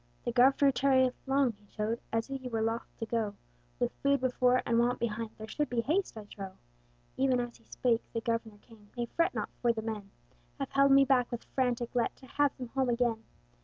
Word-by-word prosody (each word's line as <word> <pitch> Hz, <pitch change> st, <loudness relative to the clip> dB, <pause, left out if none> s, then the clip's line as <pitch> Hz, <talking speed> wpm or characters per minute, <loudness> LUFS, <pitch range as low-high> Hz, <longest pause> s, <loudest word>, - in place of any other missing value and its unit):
"The 240 Hz, -, 0 dB
Governor 270 Hz, +3 st, +5 dB
tarrieth 260 Hz, -1 st, +3 dB
long," 270 Hz, -2 st, +3 dB
he 205 Hz, -1 st, -23 dB
chode, 215 Hz, +3 st, -2 dB
"As 225 Hz, 0 st, 0 dB
he 270 Hz, -2 st, -5 dB
were 225 Hz, -2 st, -1 dB
loth 225 Hz, +1 st, -1 dB
to 225 Hz, -, -3 dB
go: 220 Hz, -2 st, -1 dB, 0.4 s
With -, -, +1 dB
food 280 Hz, 0 st, +3 dB
before, 250 Hz, 0 st, +3 dB
and 235 Hz, 0 st, +2 dB
want 245 Hz, +1 st, +2 dB
behind, 225 Hz, -1 st, -2 dB
There 220 Hz, -, -8 dB
should 295 Hz, +4 st, -2 dB
be 240 Hz, -2 st, +1 dB
haste, 320 Hz, -, 0 dB
I 215 Hz, -, -6 dB
trow." 195 Hz, -2 st, -8 dB, 0.6 s
Even 260 Hz, -2 st, +3 dB
as 240 Hz, -1 st, -4 dB
he 230 Hz, -, -27 dB
spake, 235 Hz, -2 st, +1 dB
the 230 Hz, -, -2 dB
Governor 230 Hz, -2 st, -2 dB
came: 215 Hz, -3 st, -18 dB
"Nay, 240 Hz, -, 0 dB
fret 335 Hz, -, +2 dB
not, -, -, -2 dB
for 240 Hz, -, +4 dB
the 220 Hz, -1 st, -4 dB
men 215 Hz, -3 st, -5 dB, 0.5 s
Have 275 Hz, -2 st, -4 dB
held 275 Hz, 0 st, +4 dB
me 275 Hz, 0 st, +7 dB
back 255 Hz, -2 st, +2 dB
with 240 Hz, -, -4 dB
frantic 245 Hz, -2 st, 0 dB
let, 240 Hz, -2 st, 0 dB
To 265 Hz, -, -16 dB
have 285 Hz, +1 st, +1 dB
them 250 Hz, -3 st, -6 dB
home 265 Hz, 0 st, 0 dB
again. 235 Hz, -2 st, +1 dB
240 Hz, 215 wpm, -31 LUFS, 225-265 Hz, 0.6 s, me